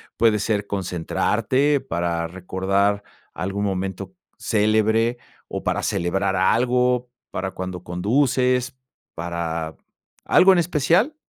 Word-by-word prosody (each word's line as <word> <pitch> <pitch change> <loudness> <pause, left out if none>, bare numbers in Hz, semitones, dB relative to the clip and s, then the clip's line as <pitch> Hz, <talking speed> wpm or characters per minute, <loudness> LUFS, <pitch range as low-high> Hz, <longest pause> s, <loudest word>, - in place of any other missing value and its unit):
puede 110 -2 +3
ser 105 0 -1
concentrarte, 100 - 0
para 85 -9 -2
recordar 95 +3 0 0.3
algún 95 +3 -2
momento 95 - -3 0.2
célebre, 110 +2 +2 0.3
o - - -5
para - - 0
celebrar 95 +3 0
algo, 125 +5 +2 0.2
para 95 +1 -3
cuando 90 -1 -6
conduces, 125 +7 +1 0.4
para 85 -1 -3 0.5
algo 190 +1 +6
en 180 - +3
especial? 170 - +2
100 Hz, 100 wpm, -22 LUFS, 90-125 Hz, 0.5 s, algo